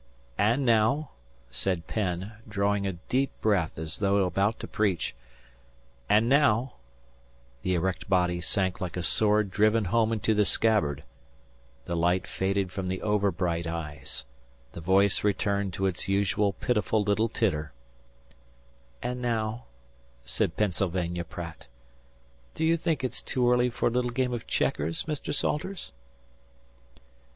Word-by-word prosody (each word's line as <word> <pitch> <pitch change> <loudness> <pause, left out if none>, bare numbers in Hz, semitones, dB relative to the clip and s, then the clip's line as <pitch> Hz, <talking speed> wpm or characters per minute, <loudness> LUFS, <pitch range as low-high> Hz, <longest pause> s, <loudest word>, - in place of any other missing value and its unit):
"And 120 +6 +3
now," 120 +6 +3 0.4
said 90 +5 -2
Penn, 95 -1 -2 0.2
drawing 100 -1 +1
a 95 - -1
deep 130 +10 -1
breath 100 -7 +1
as 80 0 -5
though 100 -1 +3
about 100 +5 0
to - - -5
preach. 95 -7 0 1.0
"And 110 +2 +4
now" 130 -3 +3 0.8
the 95 +5 0
erect 90 +2 -2
body 90 -2 +2
sank 95 +2 -1
like 90 -1 -3
a 90 - -2
sword 105 +1 +2
driven 110 +2 +3
home 110 +4 +2
into 110 0 +1
the 105 0 +3
scabbard; 80 -11 +1 0.8
the 85 - -2
light 90 +2 +2
faded 95 -1 -1
from 95 -1 -4
the 95 0 -2
overbright 90 -5 0
eyes; 75 -6 -5 0.5
the 85 - -8
voice 95 +3 +3
returned 100 -1 +1
to 95 - -1
its 95 -2 -1
usual 100 +1 +2
pitiful 105 0 0
little 105 +3 +1
titter 75 - -1 1.3
"and 125 0 -3
now," 115 -1 -1 0.6
said - - -1
Pennsylvania 90 -3 0
Pratt, 85 -5 -8 0.9
"do 160 - 0
you 165 +1 +4
think 165 -4 -1
it's 130 -1 -2
too 125 -2 0
early 125 0 +3
for 120 - 0
a - - -6
little 125 +1 0
game 125 0 0
of 120 - -5
checkers, 80 +3 0
Mr. 150 -2 -4
Salters?" 175 - -1
100 Hz, 135 wpm, -28 LUFS, 90-115 Hz, 1.3 s, And